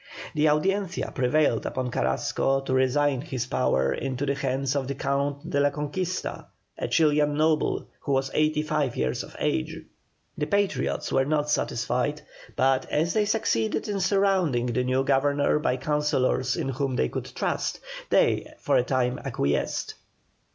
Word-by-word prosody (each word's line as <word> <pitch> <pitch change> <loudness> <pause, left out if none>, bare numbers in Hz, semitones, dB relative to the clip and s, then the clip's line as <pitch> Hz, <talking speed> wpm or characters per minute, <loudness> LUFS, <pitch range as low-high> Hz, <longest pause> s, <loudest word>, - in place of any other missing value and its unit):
The 155 +1 +3
Audiencia 190 +4 0
prevailed 125 -1 +2
upon 130 -1 -3
Carrasco 135 +3 0
to 135 - -3
resign 130 +1 +2
his 130 -6 -3
power 65 - +1
into 135 - -3
the 140 - +1
hands 135 0 -1
of 135 -2 -1
the 140 - -3
Count 140 +1 -1
de 140 - 0
la 145 0 +4
Conquista, 155 +6 -4 0.3
a - - -1
Chilian 150 -2 +3
noble, 155 0 +1
who 140 - -2
was 135 0 0
eighty 155 0 +2
five 155 -5 -1
years 65 0 0
of - - -13
age. 65 - -1 0.6
The 150 - 0
Patriots 185 - 0
were 135 - +3
not 150 0 0
satisfied, 125 +2 -1 0.3
but 130 0 +2
as 160 +3 +1
they 215 -1 +2
succeeded 205 - 0
in 205 -1 -1
surrounding 190 -9 +2
the 125 +1 0
new 130 +1 +1
Governor 145 +2 +2
by 130 -4 0
councillors 130 -2 +1
in - - -2
whom 135 0 -1
they 65 - +2
could - - -5
trust, - - -1 0.3
they - - +2
for - - +1
a - - +3
time 125 -1 0
acquiesced. 70 +1 -1
140 Hz, 160 wpm, -26 LUFS, 130-150 Hz, 0.6 s, la